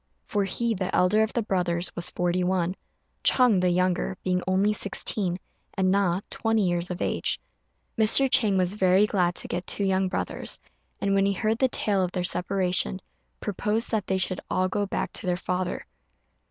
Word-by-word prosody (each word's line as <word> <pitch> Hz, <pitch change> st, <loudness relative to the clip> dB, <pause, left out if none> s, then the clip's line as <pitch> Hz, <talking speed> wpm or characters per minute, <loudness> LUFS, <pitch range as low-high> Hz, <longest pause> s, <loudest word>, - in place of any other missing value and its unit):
For 205 Hz, -1 st, 0 dB
he, 230 Hz, +5 st, 0 dB
the 185 Hz, -3 st, -2 dB
elder 195 Hz, +4 st, +4 dB
of 220 Hz, 0 st, +1 dB
the 235 Hz, -, 0 dB
brothers, 175 Hz, -3 st, -1 dB
was 175 Hz, -, -2 dB
forty 180 Hz, +1 st, 0 dB
one; 180 Hz, -1 st, 0 dB, 0.5 s
Ch'êng, 240 Hz, -8 st, +4 dB
the 180 Hz, -, +3 dB
younger, 180 Hz, +1 st, 0 dB
being 180 Hz, -1 st, 0 dB
only 195 Hz, +3 st, +2 dB
sixteen; 195 Hz, -2 st, -1 dB, 0.4 s
and 190 Hz, -2 st, +2 dB
Na, 190 Hz, -2 st, +2 dB
twenty 225 Hz, -3 st, +1 dB
years 175 Hz, 0 st, -1 dB
of 180 Hz, -1 st, -3 dB
age. -, -, -1 dB, 0.6 s
Mr. 225 Hz, +5 st, +5 dB
Chang 225 Hz, -7 st, +3 dB
was 185 Hz, 0 st, +1 dB
very 190 Hz, 0 st, +4 dB
glad 180 Hz, -4 st, +1 dB
to -, -, -1 dB
get 175 Hz, +1 st, -4 dB
two 205 Hz, -, 0 dB
young 190 Hz, -1 st, +1 dB
brothers; -, -, -2 dB, 0.4 s
and 200 Hz, 0 st, 0 dB
when 195 Hz, 0 st, +3 dB
he 200 Hz, -, +1 dB
heard 220 Hz, +4 st, -1 dB
the 260 Hz, -, +4 dB
tale 205 Hz, -5 st, +1 dB
of 180 Hz, -, -3 dB
their 180 Hz, -, -1 dB
separation, 180 Hz, -, 0 dB, 0.4 s
proposed 210 Hz, +3 st, -1 dB
that 215 Hz, -4 st, -1 dB
they 190 Hz, -, +1 dB
should 185 Hz, 0 st, -2 dB
all 185 Hz, 0 st, +1 dB
go 200 Hz, +2 st, -1 dB
back -, -, -3 dB
to -, -, -3 dB
their 175 Hz, -1 st, +1 dB
father. 180 Hz, 0 st, -3 dB
190 Hz, 185 wpm, -26 LUFS, 180-205 Hz, 0.6 s, Mr